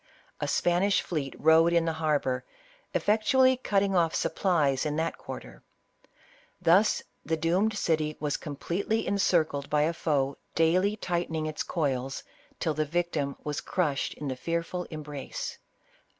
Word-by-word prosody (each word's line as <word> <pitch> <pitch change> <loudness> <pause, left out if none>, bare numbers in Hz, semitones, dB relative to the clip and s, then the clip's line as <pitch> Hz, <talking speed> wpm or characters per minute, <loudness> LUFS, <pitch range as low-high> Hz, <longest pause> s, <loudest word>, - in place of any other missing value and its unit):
A - - -2
Spanish 180 +3 +2
fleet 145 -6 -3
rode 160 +2 +5
in 170 -1 +3
the 165 - 0
harbor, 150 -5 0 0.5
effectually 255 +5 +4
cutting 200 -5 +1
off 165 -2 +2
supplies 150 -8 +1
in 150 -1 -1
that 160 +1 -2
quarter. - - -9 1.0
Thus 190 +6 +4 0.2
the 160 +2 -1
doomed 185 +7 +1
city 155 -4 0
was 150 -1 -1
completely 180 +9 -2
encircled 165 -7 +1
by 150 0 +3
a 165 +2 +1
foe 140 -4 0 0.2
daily 180 +6 +3
tightening 170 -5 -2
its 155 0 -3
coils, 135 -5 -2 0.4
till 160 - 0
the 155 +1 0
vic 175 +3 -1
tim 140 -2 -2
was 150 -1 -3
crushed 150 -7 -1
in 145 - -6
the 130 - -2
fearful 170 +5 -3
embrace. 155 - -6
165 Hz, 140 wpm, -28 LUFS, 150-180 Hz, 1.0 s, rode